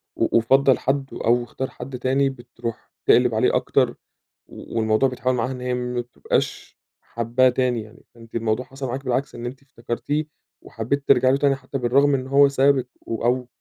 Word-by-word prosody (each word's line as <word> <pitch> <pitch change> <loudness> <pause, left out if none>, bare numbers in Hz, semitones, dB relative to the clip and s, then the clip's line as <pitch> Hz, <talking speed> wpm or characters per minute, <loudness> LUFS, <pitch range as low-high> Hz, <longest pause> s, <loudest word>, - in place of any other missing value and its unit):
و - - +2
وفضَّل 135 +3 +4
حد 135 +1 0
أو 120 +1 +1
اختار 130 +3 -5
حد 125 0 -8
تاني 135 +2 +2
بتروح 120 -2 -8
تقلب - - +4
عليه - - +2
أكتر - - +1 0.5
و - - -8
والموضوع 110 +4 +2
بيتحول 130 0 -1
معاها 120 +2 -1
إن 125 -1 -6
هي 125 0 -2
ما 125 0 -2
بتبقاش 120 0 -3 0.2
حاباه 120 +2 +1
تاني 125 -3 0
يعني، 110 +1 -14
فأنتِ 115 0 -14
الموضوع 115 +2 -1
حصل 135 +1 -6
معاكِ 130 +3 -5
بالعكس 130 +2 -1
إن 120 - -7
أنتِ 130 +3 -7
افتكرتيه 140 +4 -3 0.4
وحبيتِ 125 +6 -3
ترجعي 130 +1 +5
له 135 - +3
تاني 140 -1 +2
حتى 135 +1 -6
بالرغم 135 +3 +3
من 140 -2 +2
إنه 130 +1 -8
هو 140 +1 +6
سابِك 135 -2 +2
و 115 0 -4
أو 125 +1 +1
125 Hz, 185 wpm, -23 LUFS, 120-135 Hz, 0.5 s, هو